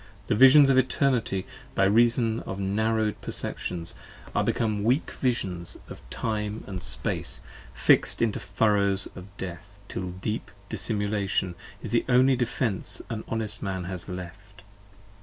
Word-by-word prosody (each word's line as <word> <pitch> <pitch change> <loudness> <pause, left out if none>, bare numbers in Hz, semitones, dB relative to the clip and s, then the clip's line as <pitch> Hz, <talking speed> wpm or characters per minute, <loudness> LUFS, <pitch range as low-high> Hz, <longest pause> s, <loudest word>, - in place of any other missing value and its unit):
The - - +3
Visions 135 +5 +8
of 130 - +5
Eternity, 125 -7 +1 0.3
by 95 - +3
reason 115 +2 +3
of 95 - -6
narrowed 110 +2 0
perceptions, 85 -2 -2 0.4
Are - - +2
become 110 -3 0
weak 125 +8 +1
Visions 95 -9 -2
of - - -9
Time 105 -1 -3 0.2
& - - -14
Space, - - 0 0.4
fix'd - - +4
into 115 -3 +1
furrows 100 -2 +2
of 90 0 -9
death: 95 +2 -8
Till 90 -2 -4
deep 105 +4 -4 0.2
dissimulation 100 -3 -1 0.3
is 110 - -5
the 115 - +2
only 130 +2 +5
defence 110 -6 -1
an 110 -1 -4
honest 110 -2 -1
man 95 -2 -3
has 90 0 -6
left. 95 +2 -9
105 Hz, 135 wpm, -26 LUFS, 95-115 Hz, 0.4 s, Visions